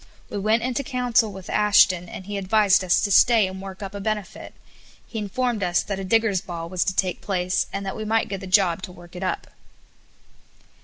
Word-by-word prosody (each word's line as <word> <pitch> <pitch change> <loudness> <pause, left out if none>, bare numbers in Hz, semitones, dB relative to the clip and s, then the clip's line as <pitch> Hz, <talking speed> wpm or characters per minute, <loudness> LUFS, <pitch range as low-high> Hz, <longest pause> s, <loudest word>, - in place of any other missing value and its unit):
We 205 - -3
went 220 +3 +1
into 255 +2 -1
council 245 -4 +1
with 190 -1 -10
Ashton, 195 -4 +3
and 190 - -8
he 205 +1 -5
advised 200 0 +3
us 180 - +3
to 205 - -1
stay 225 +1 +5
and 190 0 -6
work 195 0 -8
up 195 0 -6
a 200 - -6
benefit. 210 -1 -4 0.5
He 225 - -6
informed 235 +2 -2
us 175 -2 +1
that 195 -1 -4
a - - -4
digger's 210 -1 +2
ball 170 -2 -6
was 185 -1 0
to 185 - -1
take 185 -1 -1
place, 185 -2 -1
and 195 0 -4
that 195 - -4
we 215 - -5
might 220 +1 +1
get 195 - -4
the 190 - -8
job 185 -2 +3
to 190 - -7
work 175 0 -15
it 180 - -7
up. 185 - -2
195 Hz, 215 wpm, -23 LUFS, 185-215 Hz, 0.5 s, stay